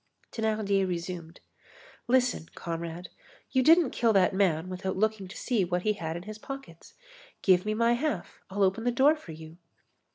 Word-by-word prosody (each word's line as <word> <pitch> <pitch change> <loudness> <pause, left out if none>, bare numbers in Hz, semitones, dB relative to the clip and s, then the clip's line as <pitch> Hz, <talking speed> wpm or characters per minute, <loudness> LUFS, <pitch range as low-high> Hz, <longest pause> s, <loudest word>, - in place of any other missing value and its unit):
Thénardier 215 -3 0
resumed: 175 -1 -5 0.7
"Listen, 250 -9 +2
comrade. 170 +1 -5 0.4
You 260 - +3
didn't 325 +1 +5
kill 230 -2 +2
that 190 -2 +4
man 185 -4 +1
without 185 +1 -4
looking 215 -1 0
to 185 - -10
see 235 -6 0
what 180 0 -1
he 215 - +2
had 165 -4 -4
in 175 - -8
his 215 +2 -8
pockets. 270 -11 -10 0.5
Give 185 0 +4
me 215 - 0
my 230 +1 +3
half. 240 - -3
I'll 200 +1 0
open 195 +4 +1
the 245 - +2
door 275 +5 +4
for 185 - -11
you." 160 +1 -11
195 Hz, 170 wpm, -28 LUFS, 175-230 Hz, 0.7 s, didn't